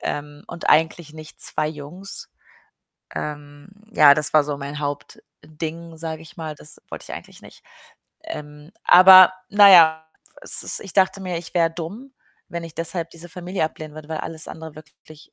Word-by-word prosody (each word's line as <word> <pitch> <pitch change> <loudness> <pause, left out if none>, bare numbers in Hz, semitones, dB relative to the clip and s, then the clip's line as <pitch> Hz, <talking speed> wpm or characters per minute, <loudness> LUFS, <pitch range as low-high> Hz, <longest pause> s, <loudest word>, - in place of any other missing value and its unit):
ähm, 145 0 -6
und 170 - -7
eigentlich 160 0 +2
nicht 155 -1 -12
2 155 - -1
Jungs. 160 +6 -8 0.9
Ähm, 145 +1 -7 0.2
ja, 145 -2 +7
das 150 -1 0
war 150 - +5
so 145 -1 -4
mein 140 +1 -6
Hauptding, 155 +3 -7
sage 160 -1 -6
ich 165 +2 -16
mal, 160 -2 -6
das 150 +1 -14
wollte - - -8
ich - - -8
eigentlich - - -12
nicht. - - -16 0.6
Ähm, 150 - -9
aber 185 0 +9 0.2
na 205 -1 +7
ja, 160 -3 +6 0.2
pf - - -21
es - - 0
ist - - -3
ich 195 -5 -10
dachte 190 0 +2
mir, 180 -2 -3
ich 170 +1 -11
wäre 165 -2 +2
dumm, 200 +12 -8 0.4
wenn 170 0 -6
ich 165 -2 -11
deshalb 165 0 -4
diese 170 +1 -11
Familie 180 +1 -4
ablehnen 155 -1 -7
würde, 155 -1 -11
weil 160 -1 -4
alles 160 -1 -6
andere 160 -1 -10
wirklich 155 0 -17
160 Hz, 175 wpm, -22 LUFS, 150-175 Hz, 0.9 s, aber